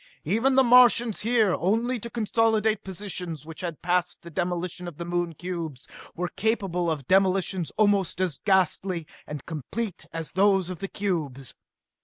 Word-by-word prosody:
Even 230 - +2
the 265 - +6
Martians, 240 -2 +6
here 225 -4 +2
only 230 +7 0
to 235 - -6
consolidate 220 -1 +1
positions 180 -5 -6
which 160 0 -8
had 170 -4 -5
passed 180 0 0
the 170 - -10
demolition 175 +1 -3
of 165 -4 -8
the 170 - -5
Moon 175 -1 -2
cubes, 165 -5 -5 0.3
were 180 +1 -2
capable 195 -6 0
of 145 -5 -3
demolitions 190 -3 +2
almost 200 -5 +2
as 180 -7 -1
ghastly 185 -3 +1 0.2
and 150 -3 -7
complete 170 - -5
as 165 -1 -5
those 190 -1 +3
of 180 - -7
the 195 - -3
cubes! 155 -11 -3
185 Hz, 155 wpm, -26 LUFS, 170-210 Hz, 0.3 s, the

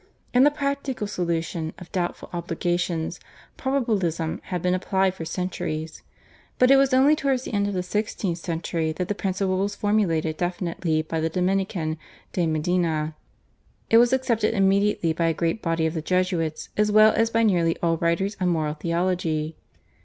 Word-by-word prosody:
In 250 +1 +6
the - - +7
practical 280 -5 -2
solution 170 -4 -2
of 180 - -12
doubtful 175 -2 -3
obligations 175 -1 -2 0.4
Probabilism 205 - -1
had 180 -3 -4
been 180 0 +2
applied 190 0 +1
for 165 -4 -7
centuries, 160 -2 -4 0.6
but 255 +1 +5
it - - +8
was 275 0 +4
only 270 +4 +5
towards 270 -4 0
the - - -7
end 200 0 +1
of 205 - -3
the 180 - -1
sixteenth 195 -2 -2
century 165 -1 -2
that 180 +3 -4
the - - +1
principle 190 -1 -1
was 200 +1 -1
formulated 170 -7 +1
definitely 175 -3 -1
by 160 +1 -3
the 160 +1 0
Dominican, 180 -3 -1 0.3
De 175 -3 +1
Medina. 160 -1 0 0.8
It 225 - +8
was 240 0 +5
accepted 235 -4 +1
immediately 195 -3 +2
by 170 +1 0
a 165 - +1
great 165 +7 -1
body 165 -1 0
of 160 - 0
the 160 - -2
Jesuits, 180 -2 -1
as 210 0 +2
well 215 +1 +7
as 225 0 +2
by 230 0 +2
nearly 175 -6 +2
all 165 -1 +2
writers 170 +5 0
on 180 - +2
moral 155 -3 0
theology. 165 -1 -1
180 Hz, 170 wpm, -24 LUFS, 165-210 Hz, 0.8 s, it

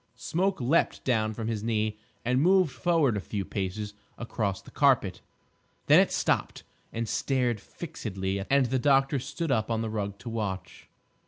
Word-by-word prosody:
Smoke 185 +9 -1
leaped 135 +7 +1
down 110 -4 +1
from 110 0 -4
his 110 -2 -2
knee 110 -1 -1 0.3
and 125 +2 +2
moved 185 -1 +4
forward 160 -5 +2
a - - 0
few 100 0 -4
paces 100 +2 -4 0.2
across 110 -5 -2
the - - -15
carpet. - - +2 0.6
Then - - +7
it - - +3
stopped - - 0 0.3
and 115 0 -3
stared 125 -3 0
fixedly; 100 - -4
and 140 -1 +4
the 130 +2 0
doctor 135 +1 +3
stood 160 +4 -3
up 110 -3 +1
on 115 -1 0
the 110 - -3
rug 100 -2 -3
to 120 - -8
watch. 105 -4 -5
115 Hz, 165 wpm, -28 LUFS, 105-135 Hz, 0.6 s, Then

